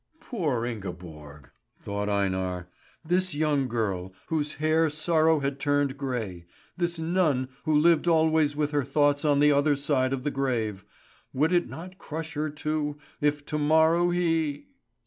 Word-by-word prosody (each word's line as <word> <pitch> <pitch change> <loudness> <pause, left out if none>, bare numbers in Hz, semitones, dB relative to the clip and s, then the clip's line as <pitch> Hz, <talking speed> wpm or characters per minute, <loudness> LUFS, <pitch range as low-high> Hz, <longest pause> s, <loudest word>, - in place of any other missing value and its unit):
"Poor 150 - -2
Ingeborg!" 85 - -8 0.3
thought 100 0 -3
Einar. 95 -3 -1 0.4
This 185 0 0
young 145 -3 +1
girl, 100 -6 -2 0.2
whose 150 -2 -1
hair 155 +1 +2
sorrow 160 0 +2
had 140 0 -2
turned 145 -1 +1
grey 115 -11 -4 0.3
this 175 -1 -1
nun, 160 -6 +1 0.2
who 155 -1 +3
lived 165 +2 +4
always 160 -3 +3
with 150 0 -1
her 145 -2 +1
thoughts 145 +2 +2
on 145 -2 +3
the 150 0 +5
other 145 +1 +3
side 135 -2 0
of 135 -2 -2
the 145 - -1
grave 115 -8 -2 0.5
would 155 +6 +2
it 175 -1 +2
not 180 +6 -9
crush 160 +1 -6
her, 155 +1 -2
too, 150 0 -3 0.2
if 145 0 0
to 150 - -3
morrow 160 +3 +4
he 165 - 0
145 Hz, 150 wpm, -27 LUFS, 125-160 Hz, 0.5 s, the